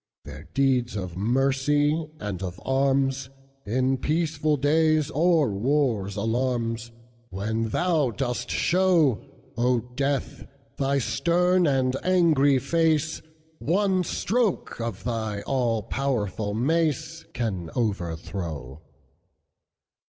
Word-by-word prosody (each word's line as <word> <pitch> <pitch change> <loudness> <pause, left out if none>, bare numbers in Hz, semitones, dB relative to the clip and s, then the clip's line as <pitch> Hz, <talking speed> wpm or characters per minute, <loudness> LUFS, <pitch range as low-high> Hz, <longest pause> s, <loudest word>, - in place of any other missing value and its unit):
Their 75 +4 -10
deeds 130 -4 +2
of 90 -4 -5
mercy 140 - +1
and 100 -4 -5
of 90 -1 -5
arms, 135 0 +1 0.4
In 130 +4 +1
peaceful 155 -1 0
days, 155 +1 +2
or 160 -4 +3
war's 110 -3 0
alarms, 115 +1 -1 0.4
When 110 +4 -2
thou 160 -2 +1
dost 125 0 -3
show,O 140 - +1
Death, 140 0 -2 0.3
thy 140 0 +1
stern 175 +9 +2
and 130 -2 +1
angry 160 -7 +4
face, 160 +2 +1 0.4
One 190 +2 +1
stroke 215 - -1
of 115 -4 -4
thy 110 -4 -2
all 120 -5 0
powerful 110 -5 -2
maceCan 140 - -1
overthrow. 85 - -3
135 Hz, 90 wpm, -25 LUFS, 110-155 Hz, 0.4 s, angry